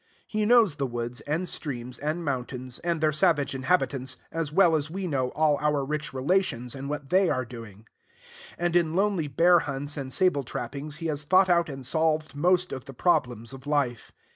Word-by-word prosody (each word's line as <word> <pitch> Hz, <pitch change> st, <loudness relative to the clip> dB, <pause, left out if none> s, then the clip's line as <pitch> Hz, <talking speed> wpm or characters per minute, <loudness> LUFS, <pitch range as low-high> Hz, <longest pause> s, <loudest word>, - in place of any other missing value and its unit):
He 215 Hz, -1 st, -1 dB
knows 225 Hz, -10 st, +5 dB
the 140 Hz, -, -1 dB
woods 120 Hz, 0 st, -4 dB
and 160 Hz, +5 st, -1 dB
streams 125 Hz, -7 st, -5 dB
and 155 Hz, +4 st, -2 dB
mountains, 125 Hz, -2 st, -4 dB
and 170 Hz, -2 st, -1 dB
their 155 Hz, -1 st, +3 dB
savage 145 Hz, -2 st, +2 dB
inhabitants, 130 Hz, -2 st, 0 dB
as 165 Hz, -3 st, -2 dB
well 170 Hz, -1 st, +5 dB
as 155 Hz, 0 st, -1 dB
we 190 Hz, +3 st, -4 dB
know 135 Hz, -6 st, 0 dB
all 150 Hz, -2 st, +2 dB
our 150 Hz, -2 st, +1 dB
rich 150 Hz, +2 st, -3 dB
relations 130 Hz, -4 st, 0 dB
and 140 Hz, +1 st, -6 dB
what 145 Hz, -1 st, -5 dB
they 190 Hz, 0 st, +4 dB
are 130 Hz, 0 st, 0 dB
doing; 115 Hz, -3 st, -11 dB, 0.7 s
and 175 Hz, 0 st, -1 dB
in 165 Hz, -2 st, +2 dB
lonely 195 Hz, -5 st, +1 dB
bear 170 Hz, +6 st, +5 dB
hunts 145 Hz, 0 st, -4 dB
and 135 Hz, -2 st, -5 dB
sable 180 Hz, -5 st, +2 dB
trappings 140 Hz, +4 st, -5 dB
he 165 Hz, -, -7 dB
has 150 Hz, -3 st, -1 dB
thought 185 Hz, +4 st, +4 dB
out 170 Hz, -2 st, +3 dB
and 135 Hz, -2 st, -7 dB
solved 155 Hz, +1 st, 0 dB
most 180 Hz, +4 st, +2 dB
of 130 Hz, -1 st, -6 dB
the 135 Hz, -2 st, -10 dB
problems 120 Hz, -7 st, 0 dB
of 135 Hz, +1 st, -11 dB
life. 140 Hz, -6 st, -1 dB
150 Hz, 190 wpm, -27 LUFS, 130-170 Hz, 0.7 s, knows